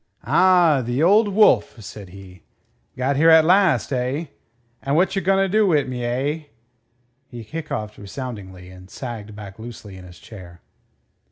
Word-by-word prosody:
"Ah! 175 -6 +4
The 120 +5 -1
Old 205 +5 +4
Wolf!" 195 - +3
said 100 -1 -10
he. 95 -1 -14 0.6
"Got 135 +2 -1
here 160 +3 +4
at 160 -1 +6
last, 185 -5 +2
eh? 130 +6 -2 0.6
And 140 +1 -1
whatcher 190 +3 +1
gonnerdo 195 +3 +2
wi' 150 -5 +2
me, 125 -2 -6
eh?" 135 +6 -2 0.8
He 120 -2 -10
hiccoughed 110 -5 -6
resoundingly, 100 -5 -9
and 90 0 -15
sagged 110 -4 -8
back 105 0 -11
loosely 110 -4 -10
in 90 - -12
his 90 -1 -14
chair. 90 -5 -13
125 Hz, 145 wpm, -21 LUFS, 105-165 Hz, 0.8 s, at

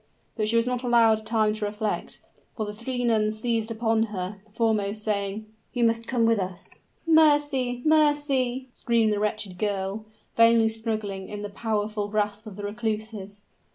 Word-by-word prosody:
But 215 -2 -1
she 230 - +1
was 230 0 +4
not 250 -1 -1
allowed 225 -3 +3
time 215 -1 +2
to 215 -1 -3
reflect; 210 +1 -3 0.4
for 215 - -1
the 210 - -5
three 245 +3 -3
nuns 215 -2 +1
seized 230 -1 -1
upon 225 0 +1
her, 195 0 -5
the - - -27
foremost 215 -2 0
saying, 205 0 -2 0.3
"You 245 - 0
must 230 0 +1
come 240 -2 +1
with 225 -2 +3
us!" 185 -2 -6 0.3
"Mercy! 290 -6 +3
mercy!" 290 -5 +2
screamed 230 -2 +1
the 205 - -1
wretched 210 -3 -2
girl, 200 0 -2 0.3
vainly 230 -1 +5
struggling 215 -4 -3
in 210 0 -6
the 205 - -4
powerful 210 0 -2
grasp 210 +1 -2
of 205 - -8
the 205 - -8
recluses. 215 -1 -4
220 Hz, 165 wpm, -26 LUFS, 210-235 Hz, 0.4 s, vainly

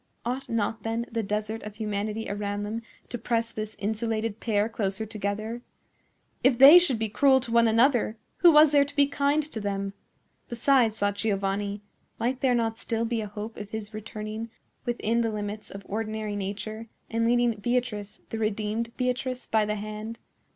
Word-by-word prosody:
Ought 255 +2 -3
not, 225 -1 -1
then, 225 +2 -2
the 230 0 0
desert 215 +1 -2
of 210 -1 -8
humanity 215 0 -2
around 205 0 -3
them 220 +2 -3 0.3
to 240 - -4
press 230 0 0
this 215 -1 -5
insulated 220 +1 -1
pair 210 -2 +1
closer 210 -1 -2
together? 215 +2 -3 0.8
If 255 -1 +5
they 280 +7 +11
should 285 -9 +2
be 220 0 -1
cruel 265 +5 +4
to 240 -2 -6
one 235 0 +5
another, 230 0 +3 0.2
who 345 - +7
was 305 -1 +7
there 285 -1 +6
to 285 +1 -9
be 285 -1 +5
kind 285 +2 +1
to 295 -6 -6
them? 200 -1 -2 0.6
Besides, 235 -2 +3
thought 205 -1 0
Giovanni, 200 0 -1 0.3
might 250 +3 -1
there 255 -2 +3
not 225 -1 0
still 230 0 -1
be 230 -1 -1
a 210 - -4
hope 210 +2 -7
of 205 -1 -7
his 215 0 -6
returning 215 +1 -6 0.4
within 235 -1 0
the 230 - +1
limits 210 0 -5
of 200 0 -9
ordinary 215 0 -3
nature, 215 +3 -5 0.2
and 230 0 +1
leading 240 0 +3
Beatrice, 210 -2 -2
the 225 - -3
redeemed 215 +2 -2
Beatrice, 255 0 -1
by 220 -1 +2
the 210 0 -1
hand? 215 +2 -6
220 Hz, 175 wpm, -27 LUFS, 210-240 Hz, 0.8 s, they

